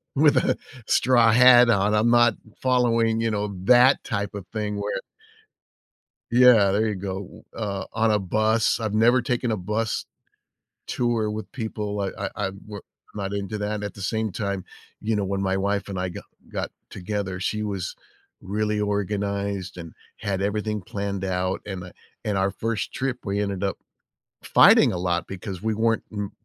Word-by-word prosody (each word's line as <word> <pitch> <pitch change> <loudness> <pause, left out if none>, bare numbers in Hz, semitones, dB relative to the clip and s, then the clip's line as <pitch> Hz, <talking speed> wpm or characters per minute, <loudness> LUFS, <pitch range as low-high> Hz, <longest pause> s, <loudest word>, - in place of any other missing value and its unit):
with 150 +1 +5
a - - +2 0.3
straw 120 -3 +4
hat 125 +1 +7
on. 100 -1 +3
I'm 110 +2 +3
not 120 -2 +5 0.3
following, 115 -3 +2
you 115 0 0
know, 105 -1 -2
that 125 +4 +6
type 100 -1 -3
of 100 -2 -6
thing 105 -2 -2
where 100 0 -2 1.3
Yeah, 120 -5 +6
there 105 +3 +2
you 105 - -1
go. 95 -1 -6
Uh, 100 -4 -3
on 115 0 +2
a 105 - +2
bus. 110 +4 +1
I've 110 -2 -2
never 120 +4 +4
taken 125 -1 -1
a 110 - 0
bus 105 +4 -2 0.8
tour 115 -3 0
with 110 +1 -6
people. 105 -4 -4
I 100 -1 -1 0.2
I - - -5
I'm 95 -1 -3
more 105 -2 -8 0.3
I'm 105 - -5
not 95 0 -3
into 100 +1 -3
that. 105 0 -3
At 105 -2 -5
the 100 - -9
same 110 +2 -1
time, 100 -2 -3 0.4
you 110 0 0
know, 100 - 0
when 95 0 -2
my 95 0 0
wife 100 +1 -1
and 95 -2 -4
I 90 0 -2
go - - -7 0.3
got - - -3 0.2
together, 95 -1 -4
she 105 +2 -1
was 100 -4 -4 0.5
really 105 +2 -1
organized 100 -2 -2
and 85 -2 -8 0.3
had 100 -2 -2
everything 105 +1 -1
planned 100 +1 -4
out, 95 0 -1
and 90 -3 -6 0.3
in 105 -2 -1
our 95 +1 +2
1st 115 0 -3
trip, 130 -1 -2
we 100 0 -1
ended 100 -1 -2
up 100 - -2 0.7
fighting - - +6
a - - -2
lot 85 -1 -1
because 95 -1 -7
we 110 0 +1
weren't 115 +1 +1
m 105 -2 -4
105 Hz, 175 wpm, -24 LUFS, 100-110 Hz, 1.3 s, hat